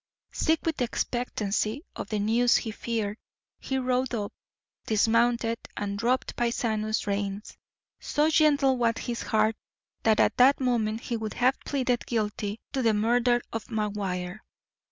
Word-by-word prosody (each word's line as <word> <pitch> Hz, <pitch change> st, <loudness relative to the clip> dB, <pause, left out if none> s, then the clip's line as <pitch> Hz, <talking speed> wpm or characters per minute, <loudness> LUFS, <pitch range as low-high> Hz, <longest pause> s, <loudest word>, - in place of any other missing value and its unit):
Sick 320 Hz, 0 st, +1 dB
with 320 Hz, -4 st, -1 dB
expectancy 235 Hz, 0 st, -1 dB
of -, -, -6 dB
the 215 Hz, -, -1 dB
news 230 Hz, +4 st, +3 dB
he 225 Hz, -, -3 dB
feared, 215 Hz, -2 st, -3 dB, 0.4 s
he 265 Hz, -, -2 dB
rode 255 Hz, -1 st, 0 dB
up, 205 Hz, -2 st, -3 dB, 0.5 s
dismounted, 230 Hz, +1 st, +2 dB, 0.2 s
and 200 Hz, -1 st, -2 dB
dropped 245 Hz, +3 st, 0 dB
Paisano's 220 Hz, -2 st, 0 dB
reins. 200 Hz, 0 st, -3 dB, 0.4 s
So 300 Hz, +2 st, +1 dB
gentle 285 Hz, -4 st, +4 dB
was 230 Hz, -2 st, +2 dB
his 240 Hz, -2 st, -4 dB
heart 215 Hz, 0 st, +2 dB, 0.5 s
that 220 Hz, -1 st, +3 dB
at -, -, +3 dB
that 265 Hz, +3 st, +6 dB
moment 230 Hz, -4 st, 0 dB
he 235 Hz, -, -3 dB
would 220 Hz, -1 st, -5 dB
have 255 Hz, +2 st, +2 dB
pleaded 255 Hz, -4 st, 0 dB
guilty 210 Hz, -2 st, -2 dB
to 270 Hz, -, 0 dB
the 225 Hz, -3 st, +3 dB
murder 240 Hz, +3 st, +2 dB
of 225 Hz, -1 st, -3 dB
McGuire. 200 Hz, -4 st, -3 dB
230 Hz, 140 wpm, -27 LUFS, 215-250 Hz, 0.5 s, that